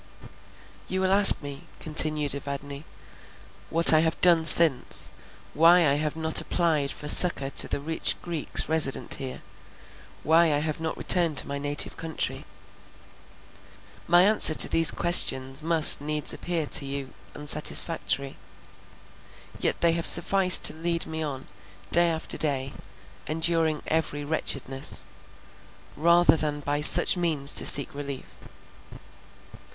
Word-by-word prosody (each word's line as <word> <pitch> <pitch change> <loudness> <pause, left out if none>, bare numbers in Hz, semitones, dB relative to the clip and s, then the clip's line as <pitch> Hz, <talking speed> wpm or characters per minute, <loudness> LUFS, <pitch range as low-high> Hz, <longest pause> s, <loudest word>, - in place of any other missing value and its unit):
"You 190 - -6
will 190 0 -3
ask 200 -5 +6
me," 140 -1 -12
continued 155 -2 -1
Evadne, 140 +1 -10 0.8
"what 165 0 +4
I 155 - +2
have 160 +1 -4
done 170 -3 +1
since; 160 -6 +3 0.4
why 165 +2 +1
I 140 - -1
have 150 +1 -5
not 160 0 0
applied 155 -5 -4
for 150 - -10
succour 150 -4 +4
to - - 0
the - - -6
rich 160 +3 -3
Greeks 170 -4 -6
resident 155 -4 -2
here; 130 -2 -8 0.8
why 165 +2 0
I - - -2
have 155 +1 -7
not 160 -1 -8
returned 170 -5 0
to - - 0
my 140 0 -8
native 145 +1 -3
country? 165 -1 -7 1.6
My 175 +1 +2
answer 205 -6 +2
to - - +4
these 165 0 +2
questions 135 -7 +1
must 160 -2 +5
needs 150 0 -4
appear 170 -3 -4
to 145 - +1
you 140 -1 -8 0.2
unsatisfactory, 145 -2 +1 1.2
yet - - -4
they 170 - +1
have 165 0 -4
sufficed 190 -2 +5
to - - +4
lead 170 +1 -4
me 160 0 -9
on, 140 -4 -9 0.5
day 175 0 +1
after 160 0 -4
day, 135 -3 -5 0.5
enduring 160 -1 -3
every 155 -2 -5
wretchedness, 135 -2 -2 0.9
rather 170 0 +1
than 150 -2 -6
by 145 +1 -5
such 155 - +7
means 155 -5 -2
to - - +2
seek 140 - +4
relief. 140 -2 -10
155 Hz, 135 wpm, -22 LUFS, 145-165 Hz, 1.6 s, such